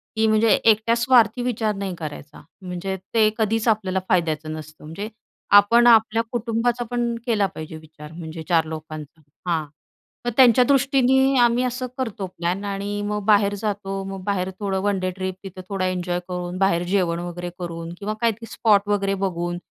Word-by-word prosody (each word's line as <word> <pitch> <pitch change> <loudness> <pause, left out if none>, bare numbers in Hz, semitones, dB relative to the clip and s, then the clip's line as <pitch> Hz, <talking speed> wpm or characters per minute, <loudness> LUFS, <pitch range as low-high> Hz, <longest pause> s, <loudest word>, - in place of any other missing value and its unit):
की 220 0 +2
म्हणजे 220 +1 +3
एकट्या 225 +1 +4
स्वार्थी 240 -1 +3
विचार 220 -3 -1
नाही 195 -2 -4
करायचा. 150 -2 -8 0.2
म्हणजे 185 +1 -4 0.2
ते 220 -2 +5
कधीच 225 +1 0
आपल्याला 200 -4 +1
फायद्याचं 155 -3 0
नसतं. 155 0 -10
म्हणजे 165 +8 -6 0.5
आपण 235 +4 +5
आपल्या 225 -1 +5
कुटुंबाचा 240 +1 -1
पण 240 -1 -1
केला 220 -5 +2
पाहिजे 155 0 -7
विचार 155 -1 -13
म्हणजे 160 -1 -7
4 165 -2 +3
लोकांचा. 155 0 -8 0.3
हां, 160 -3 0 0.6
तर - - +1
त्यांच्या 250 -2 +7
दृष्टीने 270 0 +3
आम्ही 240 +1 +3
असं 255 0 -2
करतो 225 -7 -3
प्लॅन 180 +2 -3
आणि 200 +1 -3
अ, - - -4
मग 210 0 -2
बाहेर 205 -1 +4
जातो. 195 -2 -3
मग 195 -1 -7
बाहेर 190 -2 -1
थोडं 195 -2 -1
वन 200 -1 +1
डे 185 0 -1
ट्रिप, 185 -1 -4
तिथं 185 -1 -8
थोडा 195 -2 -1
एन्जॉय 180 -1 -1
करून, 180 0 -4
बाहेर 185 -3 +2
जेवण 175 -3 +1
वगैरे 175 0 -5
करून 170 -1 -6
किंवा 210 +1 -3
काय 230 -1 +3
ते - - -7
स्पॉट 205 -3 +3
वगैरे 200 -1 +1
बघून 175 -2 -2
195 Hz, 175 wpm, -22 LUFS, 175-225 Hz, 0.6 s, त्यांच्या